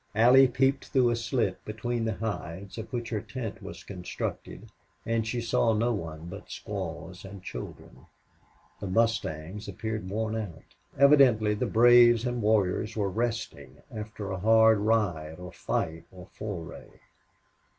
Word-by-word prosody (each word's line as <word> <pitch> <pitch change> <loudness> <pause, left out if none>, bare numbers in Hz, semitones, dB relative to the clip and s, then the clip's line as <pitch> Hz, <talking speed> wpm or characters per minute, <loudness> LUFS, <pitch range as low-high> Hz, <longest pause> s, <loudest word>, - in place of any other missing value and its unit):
Allie 125 +4 +7
peeped 135 +2 +1
through 125 -3 +3
a - - +1
slit 115 -4 -1
between 115 +2 -3
the 110 -2 -1
hides 100 -2 -5
of 110 - -8
which 120 -2 -3
her 105 -3 -1
tent 120 -2 -6
was - - -9
constructed, 90 -3 -6 0.3
and 115 -1 0
she 120 +2 -2
saw 115 0 +2
no 115 +3 +1
one 80 -5 -6
but 100 +4 -9
squaws 95 -2 -6
and 95 -1 -10
children. - - -9 0.7
The 100 - -5
mustangs 100 -3 -1
appeared 105 0 -4
worn 110 +2 -2
out. 100 -8 -7 0.2
Evidently 130 -7 +5
the 105 - -1
braves 120 0 +6
and 120 -1 -2
warriors 105 0 +1
were 100 -2 0
resting 110 - -4
after 105 -2 -6
a 95 - -3
hard 110 +1 +5
ride 95 -8 0
or 90 -1 -9
fight 80 +1 -3
or 90 +1 -13
foray. 100 -7 -7
110 Hz, 145 wpm, -28 LUFS, 95-115 Hz, 0.7 s, Allie